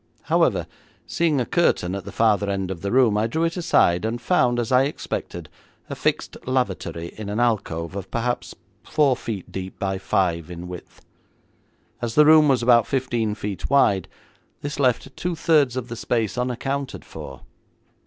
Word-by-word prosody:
However, - - +2 0.4
seeing 160 -5 +1
a 125 - 0
curtain 105 - +1
at 100 -1 -5
the - - -7
farther 105 -3 +2
end 95 -1 -2
of 90 - -6
the 100 - -3
room, 120 -4 +4
I 110 - +1
drew 160 +8 -1
it 165 0 0
aside, 135 - +3
and 115 +2 -2
found, 120 -3 +2
as 120 0 -2
I 130 +1 +5
expected, 145 - -5 0.4
a - - -3
fixed - - -1
lavatory 95 -10 -2
in 105 -2 -6
an 105 +3 -2
alcove 95 -8 -1
of 95 -1 -6
perhaps 120 +1 -2 0.3
four 145 -4 +2
feet 105 -6 -6
deep 95 0 -6
by 95 -1 -2
five 85 -4 0
in 90 0 -7
width. 90 -1 -11 1.0
As 115 -2 -3
the 150 - +7
room 155 0 +7
was 130 -4 +2
about 120 -2 +5
fifteen 120 -5 -1
feet 100 -2 -5
wide, 105 -10 +3 0.5
this 145 0 -5
left 135 0 +1
two 180 -1 -2
thirds 150 -6 +3
of 125 -1 -3
the 120 - -6
space 115 -2 -1
unaccounted 130 +2 -3
for. 65 -1 -9
115 Hz, 175 wpm, -23 LUFS, 95-135 Hz, 1.0 s, the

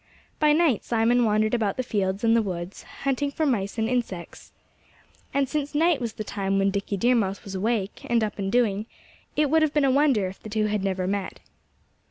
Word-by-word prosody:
By 300 -1 +4
night 305 - +3
Simon 235 +1 +2
wandered 215 +1 +2
about 215 -5 0
the 255 - 0
fields 195 -4 -1
and 225 0 +4
the 230 - +4
woods, 180 -2 -5 0.2
hunting 275 +1 0
for 310 +3 -1
mice 210 -7 -1
and 220 0 +1
insects. 230 -8 -4 0.8
And 275 -1 +1
since 295 +1 -3
night 325 -2 +3
was 230 -2 -3
the 215 - -5
time 195 -1 -2
when 195 0 +2
Dickie 200 0 -2
Deer 240 +6 +3
Mouse 200 -5 0
was 195 - -8
awake, 205 +1 -1
and 235 -1 +3
up 210 -1 -3
and 195 -1 -2
doing, 220 -3 +1 0.5
it 295 -2 +2
would 320 0 +4
have 310 -1 +1
been 295 -2 +4
a 270 - +3
wonder 270 -7 +3
if 185 - -10
the 215 - -9
two 215 0 0
had 210 -2 -1
never 190 -2 -1
met. 195 0 -3
220 Hz, 215 wpm, -25 LUFS, 195-265 Hz, 0.8 s, By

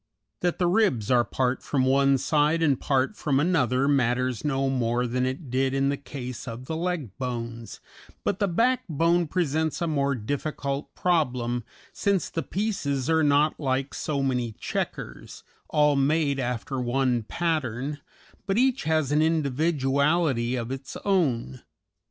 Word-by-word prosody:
That 175 -1 0
the 180 - +1
ribs 175 - +2
are 120 -1 +5
part 125 +3 -1
from 130 -3 0
one 135 +1 +4
side 150 +4 +2
and 140 -5 +2
part 135 +7 +1
from 140 -8 0
another 140 -5 +2
matters 125 -3 +1
no 135 -2 0
more 125 -2 0
than 125 +1 0
it 130 0 -5
did 130 +1 +1
in 135 0 +2
the 140 - +1
case 130 -3 -7
of 120 +2 -6
the 160 - -4
leg 165 - -3
bones; 115 -2 -5 0.4
but 200 - -1
the 200 - +2
backbone 175 - +2
presents 160 -2 0
a 170 - 0
more 140 -3 +1
difficult 140 +4 -3
problem, 125 -9 0 0.3
since 200 -3 0
the 165 - -2
pieces 165 - -1
are 160 0 +4
not 150 +1 +3
like 135 -1 -1
so 140 -3 -2
many 125 -4 -1
checkers - - -5 0.3
all 150 -1 +3
made 140 0 +2
after 125 +1 -2
one 125 0 +1
pattern 145 0 -2 0.5
but 195 +1 +1
each 260 +1 +2
has 155 -3 +1
an 150 +1 +3
individuality 145 -3 +1
of 120 0 -4
its 135 0 -6
own. 135 - 0
140 Hz, 150 wpm, -26 LUFS, 125-160 Hz, 0.5 s, are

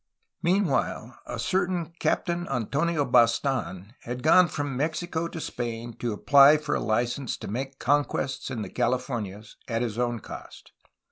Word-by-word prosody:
Meanwhile 145 - 0
a - - -5
certain 180 +4 -1
Captain 175 0 0
Antonio 140 +5 0
Bastan 115 -4 +1
had 125 +1 -6
gone 175 +3 +6
from 145 -4 -3
Mexico 160 +4 -2
to 170 - -7
Spain 120 -4 -4
to 120 - -2
apply 140 +7 +6
for 150 - -3
a - - +1
license 120 +4 -1
to - - -8
make 135 +5 -4
conquests 140 -1 0
in 120 -5 -3
the - - -7
Californias 120 -4 -2
at 115 0 -1
his 115 -1 -3
own 120 -1 0
cost. - - -11
130 Hz, 145 wpm, -26 LUFS, 120-155 Hz, -, gone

